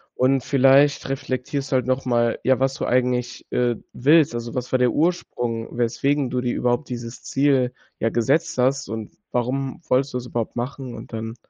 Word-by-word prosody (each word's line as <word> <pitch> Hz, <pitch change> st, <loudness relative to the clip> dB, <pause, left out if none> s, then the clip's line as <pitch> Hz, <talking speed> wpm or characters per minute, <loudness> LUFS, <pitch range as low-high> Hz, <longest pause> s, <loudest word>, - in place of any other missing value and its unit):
Und, 130 Hz, 0 st, +2 dB
vielleicht 140 Hz, +1 st, +4 dB
reflektierst 135 Hz, +1 st, -3 dB
du -, -, +2 dB
halt 125 Hz, -2 st, +2 dB
noch 130 Hz, +1 st, 0 dB
mal, 120 Hz, -2 st, +1 dB
ja, 130 Hz, 0 st, +3 dB
was 135 Hz, 0 st, +1 dB
du -, -, -3 dB
eigentlich, 125 Hz, -1 st, 0 dB
äh, 120 Hz, -1 st, +1 dB, 0.2 s
willst. 145 Hz, +1 st, +4 dB
Also, 120 Hz, 0 st, -5 dB
was 125 Hz, -1 st, -3 dB
war 130 Hz, -, +2 dB
der 125 Hz, -1 st, +3 dB
Ursprung, 120 Hz, -9 st, -1 dB
weswegen 130 Hz, +3 st, 0 dB
du 125 Hz, 0 st, 0 dB
dir 125 Hz, -1 st, -1 dB
überhaupt 125 Hz, +4 st, 0 dB
dieses 120 Hz, -1 st, -6 dB
Ziel, 135 Hz, -3 st, +2 dB, 0.3 s
ja, 115 Hz, -, +1 dB
gesetzt 130 Hz, +6 st, +1 dB
hast 135 Hz, -1 st, +1 dB
und 110 Hz, -1 st, -5 dB, 0.2 s
warum 130 Hz, +4 st, -2 dB
wolltest 135 Hz, +1 st, +1 dB
du -, -, +2 dB
es 120 Hz, -, -9 dB
überhaupt 120 Hz, -2 st, -3 dB
machen, 125 Hz, 0 st, -5 dB
und -, -, -10 dB
dann 115 Hz, +1 st, -4 dB
125 Hz, 190 wpm, -23 LUFS, 120-135 Hz, 0.3 s, vielleicht